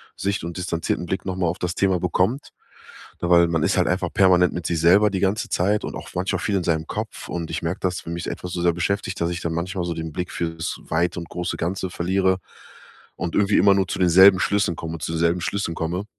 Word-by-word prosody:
Sicht 100 -2 -2
und 85 0 -5
distanzierten 90 -1 -2
Blick 95 - -3
noch 95 -1 -2
mal 90 -2 +1
auf 85 +3 -2
das 90 0 -2
Thema 95 -2 +2
bekommt. 95 +9 0 0.7
Weil 85 0 +5
man 80 -2 0
ist - - +1
halt - - +3
einfach 90 -1 0
permanent 90 -2 +4
mit 85 -1 -5
sich 85 - -1
selber 95 +6 +5
die 95 -2 -2
ganze 100 +3 0
Zeit 105 +4 +1
und - - -6
auch - - -8
manchmal 90 +2 -1
viel 105 - -1
in 90 - -1
seinem 80 -1 0
Kopf, 110 +1 -5
und 85 -2 -4
ich - - -3
merke, 85 +4 -2
dass 90 -2 -2
wenn 85 - -4
mich 85 - -5
etwas 90 -1 -5
so 85 - -2
sehr 85 -1 +3
beschäftigt, 95 +3 -2
dass 85 - +1
ich 85 - -4
dann 85 - -2
manchmal 90 +3 -3
so 85 - -2
den 80 -1 -5
Blick 90 +2 -4
fürs 80 -1 -3
Weite 85 +2 0
und 85 - -8
große 90 0 -3
Ganze 95 +2 -2
verliere 95 +2 +1 0.8
und 85 -2 -4
irgendwie 100 0 +3
immer 100 +1 +6
nur 95 -1 +1
zu - - -4
denselben 95 +1 +7
Schlüssen 100 -4 +1
komme 80 0 -5
zu 80 - -3
selben 85 +2 +2
Schlüssen 85 -1 -2
komme. 85 +5 -3
90 Hz, 235 wpm, -23 LUFS, 85-95 Hz, 0.8 s, denselben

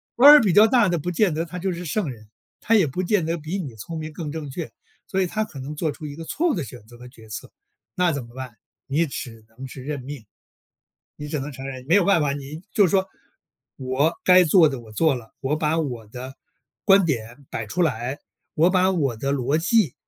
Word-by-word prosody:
官 280 +5 +9
儿 300 - +10
比 195 -7 +2
较 210 +3 +7
大 235 -3 +4
的 175 -2 0
不 175 - -3
见 180 -1 +2
得 160 +2 -1
他 180 +2 -8
就 190 +1 -1
是 175 +1 -6
圣 170 0 -1
人。 110 -3 -13 0.3
他 225 - +3
也 190 -8 +4
不 180 +8 -3
见 180 -2 +1
得 165 +1 -1
比 155 +5 -4
你 135 -10 -6
聪 160 +10 -7
明 155 0 -6
更 150 -2 -5
正 155 -3 -5
确。 155 +4 -6 0.4
所 190 0 0
以 185 - +1
他 215 +4 -1
可 150 -11 -9
能 145 +3 -6
做 155 0 -1
出 155 +1 -10
一 145 -1 -6
个 165 - -8
错 340 - 0
误 - - 0
的 170 - -2
选 120 -3 -11
择 120 - -15
和 125 +1 -12
决 115 -4 -16
策， 105 - -7 0.4
那 180 -2 +2
怎 140 -4 -4
么 120 - -17
办？ 130 -4 -8 0.3
你 155 +5 +1
只 115 -6 -7
能 130 +4 -9
是 130 0 -10
认 145 -1 -4
命。 135 -3 -8 0.9
你 150 0 -7
只 150 - -2
能 140 +2 -5
承 135 0 -8
认， 130 -1 -7
没 165 - +3
有 200 -2 +5
办 195 -2 +4
法。 145 -2 +1
你 145 +4 -7
就 205 -3 +5
是 - - -2
说， 190 -1 +2 0.7
我 135 +5 +1
该 180 0 +7
做 165 -1 +6
的 135 -4 -5
我 110 -2 -14
做 150 +6 +2
了， 115 -3 -9
我 135 +2 0
把 155 +1 0
我 125 -8 -3
的 130 +3 -8 0.5
观 195 -1 +6
点 130 -2 -3
摆 115 - -4
出 180 +12 -1
来， 130 -2 -1 0.4
我 165 +3 +4
把 185 0 +3
我 140 -10 0
的 135 +5 -1
逻 140 +2 +1
辑， 180 - +2
150 Hz, 265 characters per minute, -23 LUFS, 130-180 Hz, 0.9 s, 儿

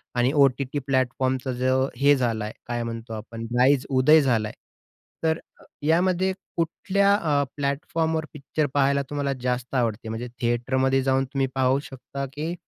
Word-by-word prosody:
आणि 120 +2 +3
ओ-टी-टी 140 0 +2
प्लॅटफॉर्मचा 130 0 0
जो 130 +2 +1
हे 145 +1 +5
झालं 115 -4 -1
आहे, 105 - -6
काय 120 -1 -2
म्हणतो 115 0 -6
आपण, 115 +1 -7
राईज 135 +1 +4
उदय 145 +4 +5
झाला 115 -6 +1
आहे. - - -9 0.7
तर 160 0 +1 0.4
यामध्ये 180 +4 +2 0.3
कुठल्या 200 +4 +2
अ, 150 -7 +1
प्लॅटफॉर्मवर 160 +3 -1
पिक्चर 150 +1 -2
पाहायला 140 0 +3
तुम्हाला 145 -1 -1
जास्त 125 +1 -2
आवडते? 115 -2 -1
म्हणजे 115 +2 -4
थिएटरमध्ये 130 +3 +1
जाऊन 135 0 +2
तुम्ही 135 0 -1
पाहू 130 +1 +3
शकता, 140 +1 -6
की 155 +4 -3
135 Hz, 145 wpm, -25 LUFS, 125-145 Hz, 0.7 s, हे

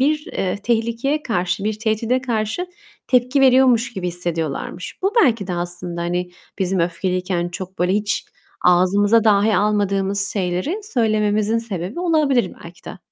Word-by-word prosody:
bir, 300 +3 +1
eee, 185 0 -1
tehlikeye 235 +6 0
karşı, 180 -5 -1
bir 215 0 -2
tehdide 225 +3 0
karşı 235 +7 -2 0.4
tepki 250 +2 +2
veriyormuş 255 -2 +4
gibi 185 -3 -4
hissediyorlarmış. 170 -1 -3
Bu 390 +2 +1
belki 225 -6 +1
de 185 - -3
aslında, 175 0 -2
hani, 175 +1 -2 0.3
bizim 190 -1 0
öfkeliyken 180 0 -1
çok 185 +2 -8
böyle, 180 +1 +1
hiç 205 0 0 0.4
ağzımıza 200 +5 +4
dahi 210 0 +4
almadığımız 200 -1 +1
şeyleri 185 - -2
söylememizin 215 - +1
sebebi 205 - -4
olabilir 300 - +2
belki 170 +1 -13
de. 195 - -9
205 Hz, 135 wpm, -20 LUFS, 180-235 Hz, 0.4 s, veriyormuş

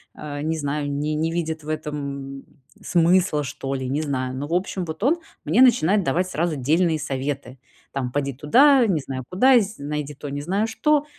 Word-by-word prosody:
э, 145 -1 -6
не 160 +2 -1
знаю, 145 -1 -2
не 150 +2 -1
не 160 +2 0
видит 160 -2 -3
в 150 - -8
этом 140 -3 -5 0.4
смысла, 170 -3 +2
что 135 0 -5
ли, 130 -1 -3
не 145 +3 0
знаю. 130 -4 -2
Но, 140 +2 -4
в 165 - -4
общем, 180 0 -1
вот 160 +2 -7
он 310 +7 +3 0.2
мне 250 - +3
начинает 210 -6 +5
давать 175 +5 0
сразу 165 -1 -1
дельные 160 +4 +1
советы, 135 -2 -4 0.3
там: 130 -3 -3
"Поди 140 0 -1
туда, 255 - +5
не 170 -6 +1
знаю 130 -1 -5
куда, 250 +7 +5
з 210 0 -4
найди 150 0 -3
то, 145 +1 -8
не 145 +1 -4
знаю 195 +8 0
что". 295 +6 +1
150 Hz, 195 wpm, -23 LUFS, 140-180 Hz, 0.4 s, начинает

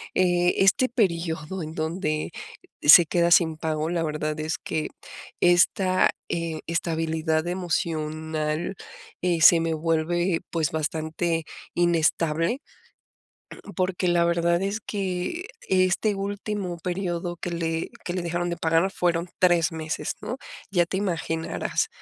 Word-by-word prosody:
eh, 175 -1 +3
este 195 +7 +4
periodo 170 - -1
en 155 0 -7
donde 155 -1 -2 0.5
se 165 +4 +9
queda 170 0 +2
sin 160 -2 +5
pago, 155 0 -2
la 170 -1 0
verdad 155 0 -2
es 155 +1 -2
que 155 -1 -3 0.5
esta, 185 +1 +4 0.2
eh, 165 -2 -2
estabilidad 160 -1 -1
emocional, 160 -2 -2 0.5
eh, 175 -2 +1
se 165 +2 +8
me 165 0 0
vuelve, 165 +2 0
pues, 160 -3 0
bastante 160 +1 -2 0.3
inestable, 165 - +1 1.1
porque 185 0 0
la 170 -1 +3
verdad 170 0 +2
es 200 +3 -1
que 200 - -3 0.2
este 185 +3 +2
último 200 -2 -3
período 175 -1 -3
que 175 - -4
le 165 -1 -2 0.2
que 175 - -2
le 185 - -2
dejaron 175 +1 -1
de 170 - -3
pagar 165 +3 +2
fueron 170 -1 0
3 175 -3 +4
meses, 160 -1 -3
¿no?, 250 - -4 0.3
ya 175 -3 +3
te 190 - -3
imaginarás. 165 - -1
170 Hz, 125 wpm, -25 LUFS, 160-180 Hz, 1.1 s, se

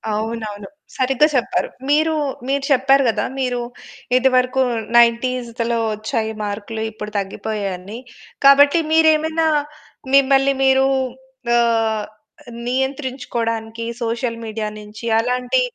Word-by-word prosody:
అవునవును. 215 -2 -4 0.3
సరిగ్గా 270 +3 +3
చెప్పారు. 245 - 0 0.2
మీరు 310 +2 +3 0.4
మీరు 280 0 0
చెప్పారు 270 +1 +4
కదా 220 - -1
మీరు 250 -2 -1 0.6
ఇదివరకు 255 0 +2 0.4
నైన్‌టీస్‌దలో 235 0 +2
వచ్చాయి 220 +1 -2
మార్కులు, 210 +2 -5
ఇప్పుడు 210 -1 -8
తగ్గిపోయాయని. 200 +1 -5 0.5
కాబట్టి 285 +3 +7
మీరేమైనా 320 0 +3 0.7
మిమ్మల్ని 275 0 +4
మీరు 265 0 +4 0.7
ఆహ్, 225 -2 +1 0.6
నియంత్రించుకోవడానికి 245 -4 -3 0.2
సోషల్ 230 0 -2
మీడియా 215 -1 -4
నుంచి 210 +2 -11
అలాంటి 250 - 0
240 Hz, 90 wpm, -19 LUFS, 220-270 Hz, 0.7 s, కాబట్టి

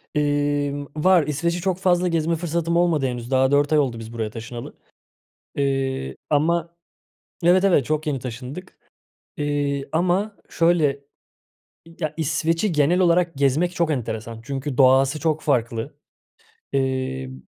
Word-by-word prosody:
Emm, 145 -1 0
var. 175 +1 +4
İsveç'i 170 +4 -1
çok 185 -1 0
fazla 180 -1 +2
gezme 165 0 +1
fırsatım 170 0 -1
olmadı 170 -5 +2
henüz, 120 0 -5
daha 130 0 +3
4 145 +2 +3
ay 150 - +5
oldu 125 -5 -1
biz 115 +1 -9
buraya 110 -2 -3
taşınalı. 120 +2 -8 0.8
Eee, 135 - -1
ama 170 +3 +1 0.7
Evet, 185 +2 +5
evet 175 -9 +4
çok 155 +2 -2
yeni 140 -3 0
taşındık. 125 +9 -8 0.6
Eee, 145 -1 -1
ama 185 +5 0
şöyle, 155 -5 +2 1.0
ya, 155 -2 -2
İsveç'i 165 +5 0
genel 155 +4 +2
olarak 170 -2 +3
gezmek 145 +6 +1
çok 170 -2 +1
enteresan 115 -3 -4
çünkü 135 +1 -4
doğası 135 +2 +4
çok 155 -1 0
farklı. 120 -1 -1 0.8
Emm 130 - -2
145 Hz, 130 wpm, -23 LUFS, 130-170 Hz, 1.0 s, ay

